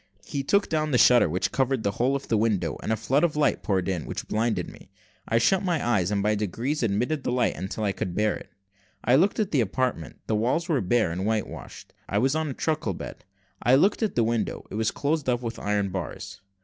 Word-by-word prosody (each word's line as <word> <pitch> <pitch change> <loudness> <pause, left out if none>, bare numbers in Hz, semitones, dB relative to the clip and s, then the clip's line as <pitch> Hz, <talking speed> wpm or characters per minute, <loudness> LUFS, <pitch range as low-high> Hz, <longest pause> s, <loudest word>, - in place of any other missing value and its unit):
He 140 - -3
took 200 +9 +2
down 155 -1 0
a - - +6
shutter 120 -6 +6
which 90 +4 -1
covered 135 -3 0
the 100 - +1
whole 125 +6 +1
of 140 - -4
the 115 - +1
window, 105 -7 +1
and - - -3
a - - +3
flood 135 +8 +1
of 170 -3 +2
light 150 -1 +2
poured 95 -3 0
in, 90 -5 -2
which - - -5
blinded 110 +1 0
me. - - -13 0.4
I 115 - +2
shut 185 +11 +3
my 175 -9 -1
eyes, 95 -7 +2
and 100 -1 0
by 105 +1 +2
degrees 115 - -2
admitted 120 +7 0
the - - -1
light 120 -2 +1
until 95 +3 -4
I 100 - +1
could 90 -2 -4
bear 105 0 +2
it. - - -10 0.5
I 120 - +3
looked 185 +12 +3
at 210 -3 0
the 140 - +3
apartment: 110 - -2
the - - -1
walls 125 +10 0
were 150 -8 +1
bare 105 -1 +2
and 90 +3 -3
white 110 0 0
washed. - - -11 0.2
I - - 0
was 135 +2 +2
on 155 -1 -1
a - - -3
truckle 150 - -1
bed. - - -9 0.4
I 125 - +5
looked 195 - +3
at 220 - 0
the 120 - +3
window 115 -1 -1
it - - -8
was 110 +1 +1
closed 145 -1 -1
up 120 0 0
with 115 -1 -4
iron 105 -1 0
bars. 95 0 -6
120 Hz, 240 wpm, -26 LUFS, 105-140 Hz, 0.5 s, a